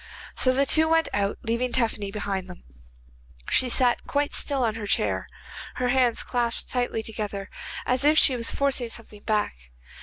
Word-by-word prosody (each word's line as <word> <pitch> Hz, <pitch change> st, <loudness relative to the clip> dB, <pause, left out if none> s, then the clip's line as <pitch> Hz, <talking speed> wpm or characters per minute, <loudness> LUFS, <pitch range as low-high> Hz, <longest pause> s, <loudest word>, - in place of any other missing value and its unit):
So 255 Hz, -, +4 dB
the 275 Hz, +2 st, +2 dB
two 315 Hz, +3 st, +4 dB
went 325 Hz, 0 st, +2 dB
out, 200 Hz, 0 st, 0 dB
leaving 240 Hz, +2 st, -1 dB
Tephany 225 Hz, -5 st, 0 dB
behind 195 Hz, -3 st, -3 dB
them. 180 Hz, -1 st, -12 dB, 0.9 s
She 255 Hz, -, +5 dB
sat 245 Hz, 0 st, +2 dB
quite 285 Hz, 0 st, 0 dB
still 275 Hz, -3 st, +1 dB
on 225 Hz, -2 st, +1 dB
her 215 Hz, -2 st, -6 dB
chair, -, -, 0 dB, 0.5 s
her 250 Hz, 0 st, -1 dB
hands 250 Hz, -2 st, +2 dB
clasped 240 Hz, -1 st, -2 dB
tightly 245 Hz, -3 st, -1 dB
together, 205 Hz, -3 st, -5 dB, 0.3 s
as 255 Hz, +2 st, 0 dB
if 300 Hz, +2 st, +4 dB
she 265 Hz, -, +5 dB
was 230 Hz, -2 st, +2 dB
forcing 270 Hz, -4 st, 0 dB
something 220 Hz, -2 st, -7 dB
back. 215 Hz, -1 st, 0 dB
240 Hz, 170 wpm, -25 LUFS, 215-260 Hz, 0.9 s, She